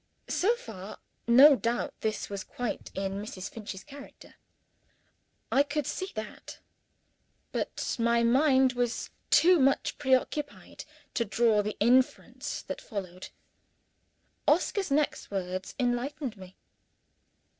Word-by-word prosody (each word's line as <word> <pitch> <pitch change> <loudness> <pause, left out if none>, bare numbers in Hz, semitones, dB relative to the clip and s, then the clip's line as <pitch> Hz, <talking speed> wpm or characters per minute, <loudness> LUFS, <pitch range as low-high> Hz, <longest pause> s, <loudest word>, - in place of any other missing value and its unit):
So 440 +6 +2
far, 215 - -9 0.3
no 270 +5 +8
doubt, 235 -1 -2
this 220 -1 -2
was 200 -1 -5
quite 245 -3 -5
in 195 +1 -3
Mrs. 195 -3 -7
Finch's 205 -3 -8
character. 285 +2 -13 1.2
I 275 - +5
could 290 0 -1
see 375 +7 -3
that 215 -1 -7 0.9
but - - -3
my 235 0 +3
mind 260 +1 +4
was 245 -1 -2 0.2
too 345 +3 +6
much 270 0 +2
pre 260 0 +4
occupied 290 +3 -5 0.3
to 235 - +1
draw 225 0 +2
the 210 +1 -4
inference 250 +4 +1
that - - -6
followed. 185 -4 -7 1.2
Oscar's 365 +4 +2
next 290 +1 0
words 185 -1 -4
enlightened 250 +1 -1
me. 185 -1 -13
240 Hz, 115 wpm, -29 LUFS, 205-280 Hz, 1.2 s, no